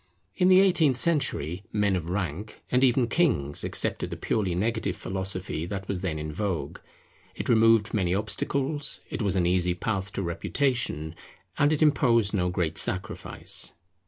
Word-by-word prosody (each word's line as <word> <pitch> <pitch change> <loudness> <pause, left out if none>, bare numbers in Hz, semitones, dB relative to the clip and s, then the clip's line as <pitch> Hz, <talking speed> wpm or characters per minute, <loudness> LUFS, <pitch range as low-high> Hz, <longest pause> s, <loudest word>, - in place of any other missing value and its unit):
In 180 - +2
the 185 0 +7
eighteenth 170 -9 +3
century, 125 - 0
men 105 -2 +1
of 85 -2 -4
rank, 95 +2 -4
and 125 +1 +3
even 125 -1 +3
kings, 115 - 0
accepted - - -1
the - - -6
purely 95 -5 -1
negative 110 0 -1
philosophy 95 -3 -3
that 95 0 -5
was 95 -3 -3
then 85 -5 -2
in 75 0 -5
vogue; 95 -1 -3 0.6
it - - -5
removed 115 -1 +4
many 95 -4 +1
obstacles, 140 +8 -1
it - - -4
was 100 -3 0
an 90 -2 +1
easy 90 0 +1
path 95 +1 -3
to 95 - -3
reputation, 85 - -1 0.5
and 145 +1 +4
it 155 0 +2
imposed 120 -8 +3
no 90 -3 0
great 85 -2 +1
sacrifice. 95 0 +1
100 Hz, 160 wpm, -26 LUFS, 90-125 Hz, 0.6 s, the